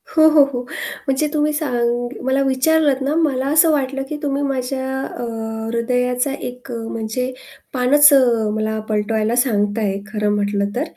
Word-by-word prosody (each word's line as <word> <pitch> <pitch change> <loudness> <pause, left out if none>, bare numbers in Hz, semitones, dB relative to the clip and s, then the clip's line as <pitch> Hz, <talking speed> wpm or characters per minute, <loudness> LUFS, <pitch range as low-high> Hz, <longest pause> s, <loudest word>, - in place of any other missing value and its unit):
हो, 315 -1 +7
हो, 305 -2 +6
हो. 245 - -2 0.5
म्हणजे 270 +3 +1
तुम्ही 300 0 +1
सांग 245 -5 -1 0.2
मला 265 +1 +1
विचारलंत 275 +1 +2
ना 280 +3 0
मला 285 -5 +1
असं 315 +3 +4
वाटलं 270 -2 -1
की 300 - -4
तुम्ही 280 -1 -1
माझ्या 265 -1 -2
अ, - - -6 0.5
हृदयाचा 250 +3 0
एक 250 -1 -8
अ, - - -4
म्हणजे 230 +3 -3 0.4
पानच 280 +3 +6
अ, 235 -5 +3
मला 220 0 -2
पलटवायला 215 +1 0
सांगताय, 205 -4 0
खरं 210 -1 -1
म्हटलं 200 0 0
तर. 255 - 0
255 Hz, 155 wpm, -19 LUFS, 230-280 Hz, 0.5 s, हो